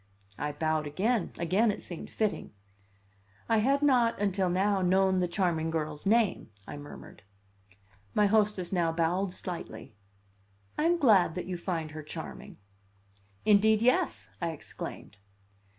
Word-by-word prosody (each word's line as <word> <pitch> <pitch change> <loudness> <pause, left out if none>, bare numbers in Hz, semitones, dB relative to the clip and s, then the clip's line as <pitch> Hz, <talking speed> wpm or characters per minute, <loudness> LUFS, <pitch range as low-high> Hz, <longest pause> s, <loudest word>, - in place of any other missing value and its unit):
I 150 +1 -2
bowed 155 0 -1
again; 200 +7 0
again 190 +7 +2
it 205 - -3
seemed 175 - -7
fitting. 215 - -2 0.9
"I 225 -1 +3
had 275 +6 +2
not, 245 -5 +3
until 195 -2 +1
now, 195 +2 +1
known 190 +1 +3
the 180 - +1
charming 170 -3 0
girl's 155 0 -3
name," 220 - +2 0.2
I - - -7
murmured. 145 0 -11 0.9
My 210 - +4
hostess 205 -3 +1
now 170 -3 +2
bowed 175 +4 0
slightly. 170 -13 -6 0.8
"I 305 - 0
am 345 +1 +3
glad 210 - +4
that 180 - -4
you 185 - -4
find 170 -3 -3
her 155 0 -7
charming." 75 - -8 0.9
"Indeed, 215 +1 +4
yes!" 105 - +1
I 170 - 0
exclaimed. 145 -8 -8
185 Hz, 135 wpm, -29 LUFS, 160-210 Hz, 0.9 s, My